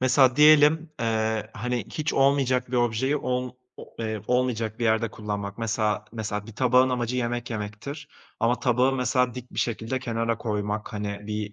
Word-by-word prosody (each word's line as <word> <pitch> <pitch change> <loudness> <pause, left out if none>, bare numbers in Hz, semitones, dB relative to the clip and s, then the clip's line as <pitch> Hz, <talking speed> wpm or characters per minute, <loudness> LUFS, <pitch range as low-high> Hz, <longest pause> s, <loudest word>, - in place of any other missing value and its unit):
mesela 130 0 +4
diyelim, 155 +1 +6
eee, 110 -1 -1
hani, 120 +2 -2
hiç 155 +1 -2
olmayacak 135 -2 +2
bir 125 - 0
objeyi 120 +4 +1
ol 125 -2 -2 0.2
o - - -9
eee, 110 -2 -3
olmayacak 120 -3 0
bir 120 - -1
yerde 110 0 +2
kullanmak. 100 -2 -5
Mesela 110 -2 0
mesela 105 -2 -4
bir 115 - -11
tabağın 125 +2 +4
amacı 125 0 -1
yemek 120 -1 -2
yemektir. 115 +8 -6 0.3
Ama 120 +2 +2
tabağı 125 +1 +3
mesela 125 -1 +1
dik 125 -1 -8
bir - - -7
şekilde 115 +2 -1
kenara 115 -2 -2
koymak, 105 0 -3
hani, 105 -1 -4
bir 105 -1 -4
120 Hz, 165 wpm, -26 LUFS, 110-130 Hz, 0.3 s, diyelim